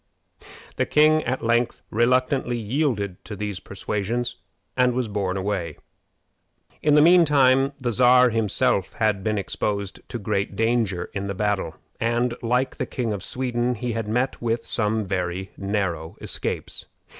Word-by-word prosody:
The - - +1
king 155 +1 +4
at 130 +1 -2
length 120 +1 +1
reluctantly 125 +2 +2
yielded 110 - -1
to 105 - -7
these 105 -2 -4
persuasions, 115 +4 -3 0.4
and 125 -1 +3
was 125 -2 0
borne 100 -3 -2
away. 95 -5 -2 1.0
In 150 -1 +4
the 150 - +7
mean 175 +1 +7
time, 135 -2 +4
the 125 -2 -1
Czar 125 +2 +5
himself 105 -3 +1
had 105 -4 0
been 110 0 0
exposed 100 0 -3
to - - -4
great 100 -2 -2
danger 115 -5 0
in 100 0 -3
the 100 - -3
battle, 100 -5 -1 0.2
and, 120 +1 +1
like 125 +2 0
the - - -2
King 120 -5 -2
of 100 - -5
Sweden, 125 +2 -1
had 115 -1 -3
met 125 +5 -1
with 115 0 -1
some 110 -1 0
very 90 0 -3
narrow 95 -5 -2
escapes. - - -3
115 Hz, 145 wpm, -24 LUFS, 100-125 Hz, 1.0 s, the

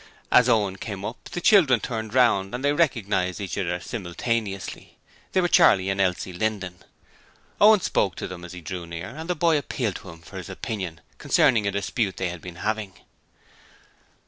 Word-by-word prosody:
As 125 0 +6
Owen 105 -5 +2
came 100 -1 -6
up 120 - -7
the - - -5
children 170 - +5
turned 110 -1 -5
round 115 -5 +3
and 130 +3 -3
they 145 - +3
recognized 105 - 0
each 95 -4 -4
other 90 -2 -1
simultaneously. 100 +1 -4 0.3
They 185 - +2
were 175 - +2
Charley 100 - +5
and 95 0 0
Elsie 90 0 -1
Linden. 95 -2 -2 0.8
Owen 210 -1 +7
spoke 95 - 0
to - - -5
them 90 -1 -9
as 90 +1 -9
he 90 - -8
drew 85 0 -6
near 85 +3 -6
and 160 +8 -8
the 180 - +1
boy 160 -1 +3
appealed 120 -7 -3
to - - -12
him 85 0 -12
for - - -10
his - - -7
opinion 95 -7 -5 0.2
concerning 105 -3 +3
a - - +1
dispute 100 +1 -2
they 95 - -1
had 85 -1 -7
been 90 -2 -9
having. 110 -3 -2
100 Hz, 185 wpm, -25 LUFS, 90-125 Hz, 0.8 s, Owen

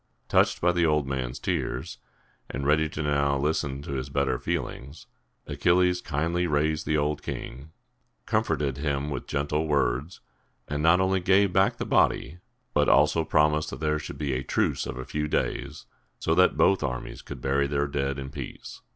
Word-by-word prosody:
Touched - - +3
by 90 - +4
the 85 -1 +1
old 75 -3 +2
man's 65 -2 -3
tears, - - -3 0.5
and 70 - -4
ready 75 +2 +3
now 70 -1 +1
to - - 0
listen 70 -2 -1
to 75 - -7
his 65 0 -3
better 70 0 0
feelings, 75 -3 -4 0.4
Achilles 90 0 +2
kindly 85 +4 -1
raised 75 0 0
the 75 - +2
old 75 0 0
king, 65 +5 -7 0.6
comforted 70 -2 0
him 70 0 -1
with 70 - -5
gentle 75 +2 -1
words, 70 +2 0 0.5
and 75 0 -2
not 85 +3 +5
only 95 0 +2
gave 95 +1 +3
back 95 +1 +3
the - - -3
body, 80 +6 +1 0.3
but - - +3
also 80 - +4
promised 75 0 +2
that - - -7
there 75 -1 0
should 75 - -7
be 70 -3 -2
a 65 - -1
truce - - 0
of 65 - -5
a 65 - -5
few 75 +2 -2
days, - - -2 0.3
so 80 - 0
that 90 +2 +4
both 95 - +4
armies 60 -2 -4
could - - -9
bury 70 +1 +1
their 70 0 0
dead 70 -1 -2
in 70 0 -6
peace. - - -8
75 Hz, 175 wpm, -26 LUFS, 70-80 Hz, 0.6 s, not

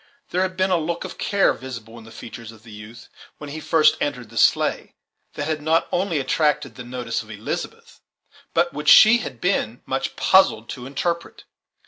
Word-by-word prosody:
There 180 - 0
had 185 0 -2
been 190 0 +1
a 180 - +4
look 170 +3 -3
of 185 - -9
care 200 -1 +2
visible 115 -4 -9
in 110 - -14
the 110 - -13
features 115 0 -10
of 110 -1 -18
the 115 - -14
youth, 105 +2 -12 0.3
when 150 -1 -9
he 155 - -6
first 155 0 +3
entered 125 -6 -3
the - - -14
sleigh, - - +2 0.4
that 145 - -3
had 155 -1 -2
not 160 +2 +1
only 175 -2 0
attracted 150 +2 0
the 125 - -9
notice 120 -1 -4
of - - -15
Elizabeth, - - -6 0.5
but 175 - +2
which 150 0 -1
she 230 +2 +8
had 130 - -7
been 125 - -1
much 135 0 -3
puzzled 155 - +3
to 125 -2 -7
interpret. 170 +5 -3
145 Hz, 190 wpm, -22 LUFS, 120-170 Hz, 0.5 s, she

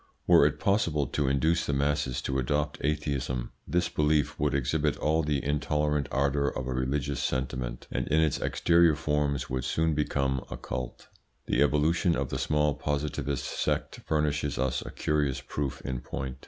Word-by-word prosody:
Were - - +7
it - - -3
possible 85 -8 +1
to 70 +2 -1
induce 80 +5 +2
the 70 - 0
masses 70 -1 0
to 65 0 -1
adopt 75 +3 -1
atheism, 70 -4 -1 0.2
this 85 0 +1
belief 75 -3 +1
would - - +1
exhibit 75 +3 0
all 80 +2 +1
the 75 -3 -1
intolerant 75 0 0
ardour 70 +1 +1
of 65 - -3
a 65 - -2
religious 70 +2 -1
sentiment, 65 -2 -3
and - - -2
in 75 +2 +3
its 80 -3 +2
exterior 85 -2 +3
forms 75 -3 0
would 65 -1 -2
soon 80 +4 +1
become 70 -3 0
a - - -5
cult. 65 0 -6 0.4
The 65 - +1
evolution 80 +4 +3
of 70 -1 -2
the - - -3
small 75 -1 +2
Positivist 70 -2 -2
sect - - -2
furnishes 75 -2 0
us 65 0 0
a - - -7
curious 75 -3 0
proof 70 -2 -4
in 65 -2 -3
point. 65 -1 -5
75 Hz, 170 wpm, -28 LUFS, 65-75 Hz, 0.4 s, Were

